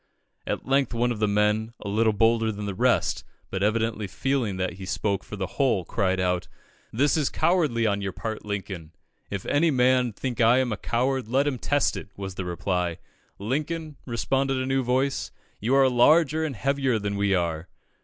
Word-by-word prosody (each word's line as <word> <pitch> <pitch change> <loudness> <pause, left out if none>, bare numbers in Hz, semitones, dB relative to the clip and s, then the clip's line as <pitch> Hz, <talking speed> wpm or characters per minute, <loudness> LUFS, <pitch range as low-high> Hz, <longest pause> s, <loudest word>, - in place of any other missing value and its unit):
At - - -3
length 135 -2 +1
one 120 +1 +1
of 115 - -4
the 105 - +2
men, 105 +2 +1
a - - -8
little 110 +2 +2
bolder 115 +1 +2
than 105 0 -6
the 100 - -3
rest, - - +1 0.3
but 95 - -2
evidently 110 0 0
feeling 125 -2 -1
that 95 -1 -1
he 95 - -6
spoke 100 -1 -1
for - - -8
the 95 -2 -2 0.2
whole, 120 -10 +2
cried 95 -1 0
out 90 -1 0 0.4
"This 140 +6 +2
is 150 -4 +1
cowardly 150 -10 +1
on 100 -2 +1
your 100 -1 -2
part, 110 +4 -5
Lincoln!" 95 -6 -5 0.4
"If 100 -2 -4
any 165 +3 +3
man 125 -2 +3
think 120 +3 -3
I 115 +2 +6
am 130 -2 +1
a 105 - -2
coward, 130 +2 -1
let 135 +4 +2
him 135 -4 -1
test 145 +3 +1
it," - - -7
was 95 -1 -5
the 95 0 -5
reply. 90 -1 -1 0.4
"Lincoln," 150 +8 -3
responded 135 +3 0
a 130 - -1
new 135 0 +1
voice, 130 +2 0 0.3
"you 120 +6 +1
are 135 -1 +6
larger 155 +5 +4
and 145 -4 -4
heavier 135 +1 +1
than 100 -1 -3
we 100 -1 +2
are." 85 -1 -2
115 Hz, 195 wpm, -25 LUFS, 100-135 Hz, 0.4 s, I